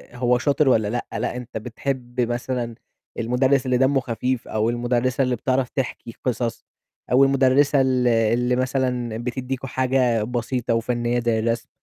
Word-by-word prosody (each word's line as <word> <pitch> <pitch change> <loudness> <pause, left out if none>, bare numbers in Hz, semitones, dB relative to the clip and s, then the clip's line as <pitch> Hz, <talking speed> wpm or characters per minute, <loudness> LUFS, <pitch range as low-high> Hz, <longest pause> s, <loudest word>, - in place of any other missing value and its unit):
هو 125 0 +2
شاطر 140 +2 +2
والّا 110 -4 +3
لأ، 120 +3 -3
لأ - - -2
أنت 125 -2 -7
بتحب 125 +2 -4
مثلًا 120 0 -2 0.4
المدرس 130 +3 +2
اللي 125 -1 +2
دمّه 135 +2 +3
خفيف 125 0 -2
أو 110 +1 0
المُدرِّسة 120 +2 0
اللي 125 -1 0
بتعرف 130 +1 0
تحكي 120 -3 -4
قصص 120 -2 -2 0.5
أو 130 +2 +6
المُدرِّسة 135 +1 +4
ال 130 -2 +2
اللي 115 +2 +2
مثلًا 125 -3 -1
بتدّيكم 125 +2 -4
حاجة 125 -4 +1
بسيطة 120 +1 -2
وفنّية 120 +1 0
زي 115 -2 +1
الرسم، 115 +1 -1
125 Hz, 145 wpm, -23 LUFS, 120-130 Hz, 0.5 s, أو